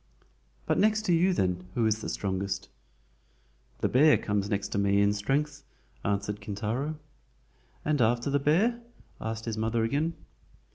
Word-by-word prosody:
"But - - +1
next 215 +1 +3
to 185 -5 +2
you 175 +3 +4
then, 90 - 0
who 115 - +2
is 110 0 +1
the - - -4
strongest?" 95 -1 -3 1.1
"The - - +3
bear 150 +4 +5
comes 105 -1 -1
next 100 -2 -1
to - - -1
me 100 0 +3
in 100 0 +4
strength," 140 +7 -1 0.4
answered 100 +1 -1
Kintaro. 115 +9 -3 0.9
"And 150 -3 +1
after 120 +4 +2
the 140 - +3
bear?" 200 - +2 0.4
asked 110 0 -4
his 110 -2 -3
mother 115 +1 +1
again. 150 +8 0
115 Hz, 150 wpm, -28 LUFS, 100-150 Hz, 1.1 s, bear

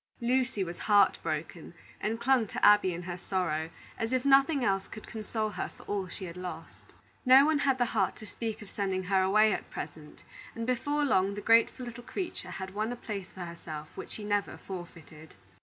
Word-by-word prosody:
Lucy 245 -3 +1
was 170 -1 -6
heart 205 -2 +4
broken, - - -4 0.2
and 225 +2 -2
clung 255 -3 +3
to - - 0
Abby 205 -3 +6
in 175 +1 -5
her 175 0 -5
sorrow, 165 -4 -1 0.3
as 225 +1 -1
if 255 0 +1
nothing 275 0 +5
else 195 -1 +1
could 215 - -10
console 220 -1 -3
her - - -4
for - - -16
all 200 -2 -2
she 185 - -7
had 170 -1 -8
lost. 180 0 -8 0.3
No 265 +2 +8
one 310 -1 +3
had 270 -2 +2
the 245 - +2
heart - - +1
to 215 - -10
speak 220 0 -5
of 200 - -13
sending 190 -2 -1
her 190 +1 +2
away 215 +3 +4
at - - -5
present; 150 -1 -8 0.3
and, 230 - -3
before 290 +4 0
long, 195 -6 +2
the - - -4
grateful 230 +3 +4
little 240 0 -8
creature 365 +7 -5
had 190 0 -6
won 215 +3 -1
a - - -3
place 200 -5 -6
for 190 - -10
herself 155 -3 -8
which - - -7
she 215 - -7
never 205 -1 -1
forfeited. 165 -4 -10
210 Hz, 205 wpm, -30 LUFS, 185-245 Hz, 0.3 s, No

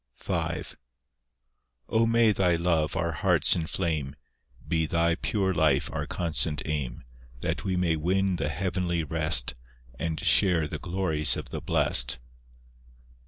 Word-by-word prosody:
V - - -5 1.5
O 115 0 +2
may 115 -1 +4
Thy 90 -4 +2
Love 85 -3 0
our - - 0
hearts - - +3
inflame; 80 -4 -2 0.5
Be 80 -1 0
Thy 85 +1 +2
pure 95 +2 -1
life 80 -4 +2
our - - -3
constant 80 -4 -1
aim; 70 -6 -3 0.4
That - - -2
we 95 -2 -1
may 90 -3 +1
win 95 +4 0
the 75 -2 -1
heavenly 90 +1 -1
rest, 60 -4 +1 0.5
And 80 -1 -2
share 85 -5 +3
the 75 0 -5
glories 85 -5 0
of - - -7
the - - -4
blest. 60 0 +2
85 Hz, 130 wpm, -27 LUFS, 75-90 Hz, 1.5 s, may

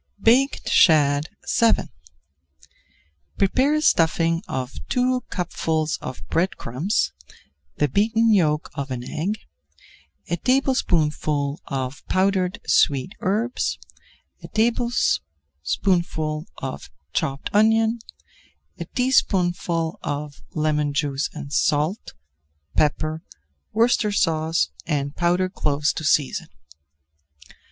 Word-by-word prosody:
BAKED 250 +6 +3
SHAD 150 -1 +4 0.3
VII 230 -1 +3 1.5
Prepare 260 +9 +2
a 305 - +1
stuffing 165 - +3
of 130 0 -4 0.2
two 250 0 +1
cupfuls 160 -3 -1
of 130 - -8
bread 180 +3 0
crumbs, 150 - -1 0.6
the 150 - +1
beaten 220 - +2
yolk 155 -5 +1
of 140 0 -4
an 125 -2 -4
egg, 195 +8 -2 0.9
a 175 - -1
tablespoonful 155 - +1
of 130 -1 -4
powdered 185 -1 +1
sweet 140 +5 +2
herbs, 220 +6 -1 0.6
a - - -9
tablespoonful 160 - -1
of 130 0 -6 0.2
chopped 135 0 -2
onion, 225 +2 +3 0.8
a - - -4
teaspoonful 180 -8 +1
of 145 0 -5
lemon 150 -2 0
juice 140 0 0
and 145 -2 -8
salt, 155 - 0 0.6
pepper, 155 +1 +1 0.5
Worcestershire 205 -8 +2 0.4
and 140 -1 -1
powdered 180 +2 +1
cloves 145 -2 0
to - - -5
season. 145 -2 +1
165 Hz, 95 wpm, -23 LUFS, 145-210 Hz, 1.5 s, SHAD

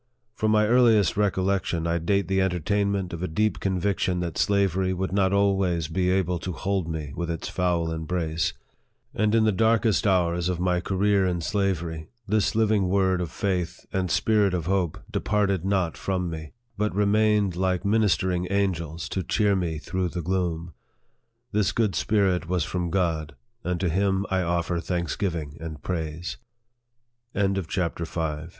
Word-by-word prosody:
From 110 - 0
my 105 0 +4
earliest 115 -5 +4
recollection, 95 -4 0
I 85 0 +1
date 100 +2 +1
the 95 +1 +2
entertainment 95 +1 0
of 85 - -5
a 90 - -1
deep 105 +7 0
conviction 95 -1 0
that 85 -2 -3
slavery 95 -2 +1
would 95 +1 -2
not 95 -1 +2
always 95 -5 +2
be 90 +3 0
able 90 -2 +1
to 90 +2 -4
hold 95 0 -1
me 75 -4 -4
within 85 -1 -2
its - - -6
foul 85 -3 0
embrace; 80 +1 -1 0.6
and 110 +1 +1
in 115 - +4
the 110 - +4
darkest 110 +1 +2
hours 90 -2 +2
of 90 -2 -2
my 90 0 +1
career 95 +1 +2
in 90 -1 -1
slavery, 85 -3 -1 0.2
this 105 +1 +1
living 105 -4 +2
word 95 -1 +2
of 85 - -3
faith 90 -2 -2
and 95 -1 0
spirit 105 0 +2
of 85 -3 -2
hope 95 -2 0
departed 100 -3 0
not 95 -4 +1
from 90 -3 -2
me, 80 -2 -7 0.3
but 105 -2 0
remained 105 -2 +2
like 95 0 0
ministering 95 -4 +2
angels 85 -5 -1
to 95 - -2
cheer 100 +3 +2
me 85 -4 -1
through 90 +3 -2
the 85 0 -4
gloom. 85 -2 -2 0.8
This 105 -1 +2
good 110 -4 +1
spirit 95 -4 +1
was 90 -3 +1
from 90 +2 -2
God, 80 -5 -1 0.3
and 90 0 -1
to 95 - 0
him 95 +3 +1
I 95 -1 +2
offer 85 0 0
thanksgi 85 -2 -2
95 Hz, 150 wpm, -25 LUFS, 85-100 Hz, 0.8 s, my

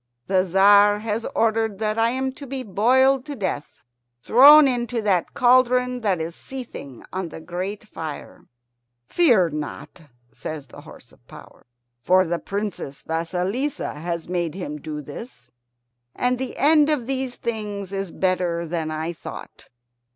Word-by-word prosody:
"The 190 -1 +2
Tzar 200 +3 +5
has 225 +1 -2
ordered 225 -2 +1
that 215 +1 -1
I 225 +1 +3
am 260 +2 -2
to 280 +1 -11
be 265 0 -4
boiled 255 +6 +3
to 290 - -5
death 185 - -4 0.4
thrown 285 +5 +8
into 240 -2 -1
that 190 -4 0
cauldron 250 0 +3
that 195 -6 0
is 160 +1 -4
seething 240 - -9
on 185 -2 -3
the 160 - -9
great 185 +6 -5
fire." 160 -7 -8 0.6
"Fear 235 - +3
not," 150 +2 -7 0.3
says 155 -3 -7
the 120 - -13
horse - - -15
of - - -25
power, - - -15 0.3
"for 185 +7 +4
the 170 0 -2
Princess 200 -9 -5
Vasilissa 180 - -2
has 170 +2 -5
made 175 -2 -2
him 150 -6 -6
do 150 -1 -6
this, 140 - -10 0.6
and 250 0 0
the 260 -1 -5
end 300 +1 +4
of 295 -6 0
these 260 -1 -3
things 210 -4 -5
is 195 -2 -3
better 180 -2 -1
than 165 -1 -3
I 160 +2 -3
thought. - - -10
200 Hz, 150 wpm, -23 LUFS, 170-250 Hz, 0.6 s, thrown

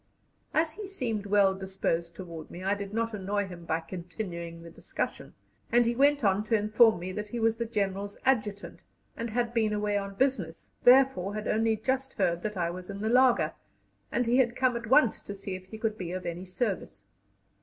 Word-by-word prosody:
As 315 +1 +2
he 405 +4 -7
seemed 230 - -3
well 200 -1 +4
disposed 190 -3 -2
toward 165 -4 -8
me, 180 - -8
I 195 +1 +2
did 200 -1 -5
not 230 +1 -1
annoy 205 0 -1
him 175 -3 -10
by 160 0 0
continuing 170 -2 -6
the 170 - -10
discussion, - - -5 0.4
and 240 0 +5
he 235 - +2
went 285 +1 +4
on 200 0 +3
to 225 - +2
inform 215 +1 +5
me 180 +2 -5
that 210 +2 -4
he 235 - -4
was 225 0 +2
the 235 0 -2
General's 200 -2 -2
Adjutant, 210 -6 0 0.3
and 230 0 -4
had 235 +1 -1
been 220 -2 +2
away 210 0 0
on 200 0 -6
business, 205 -11 -1
therefore 250 -7 +5
had 215 0 -4
only 225 0 +2
just 265 +4 -1
heard 175 -4 +1
that 210 0 -4
I 170 -1 0
was 180 +1 -8
in 200 0 -6
the 220 - 0
laager, 250 +1 +4 0.6
and 245 +1 +1
he 240 +2 +3
had 240 -2 +3
come 255 -2 +2
at 235 -1 -4
once 260 -1 +4
to 200 - -7
see 195 -1 -6
if 185 0 -8
he 220 - -8
could 220 -1 -2
be 180 -1 -4
of 185 0 -5
any 170 +2 -4
service. 195 +2 -3
210 Hz, 210 wpm, -29 LUFS, 185-235 Hz, 0.6 s, and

